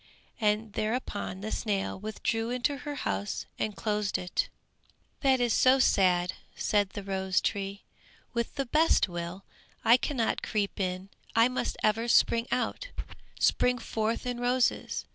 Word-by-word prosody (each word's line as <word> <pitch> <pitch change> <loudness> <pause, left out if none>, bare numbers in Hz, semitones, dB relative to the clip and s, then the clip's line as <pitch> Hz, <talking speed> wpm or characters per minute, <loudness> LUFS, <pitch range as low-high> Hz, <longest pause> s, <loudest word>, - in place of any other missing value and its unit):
And 210 -1 +1
thereupon 215 -4 -2
the 215 +2 -4
snail 200 -3 -1
withdrew 225 +2 -2
into 250 +4 0
her 290 +2 -5
house 100 - -2
and 215 -2 -1
closed 210 +2 0
it. 180 - -1 0.7
"That 265 -2 +3
is 240 -2 +2
so 260 +1 +5
sad," 180 -7 +3 0.2
said 205 -2 +1
the 205 - -7
rose 190 -1 0
tree, 200 0 -3 0.5
"with 235 -1 -2
the 275 -2 -1
best 310 +2 +3
will, 175 +2 -6 0.4
I 235 +2 +8
cannot 255 -3 -1
creep 205 -2 -2
in, 185 0 -2 0.3
I 230 +2 +6
must 255 - -2
ever 225 +2 +2
spring 235 0 +4
out, - - -1 0.5
spring 250 0 +3
forth 225 0 -2
in 245 -1 -2
roses. 245 +1 +1
220 Hz, 145 wpm, -29 LUFS, 195-245 Hz, 0.7 s, I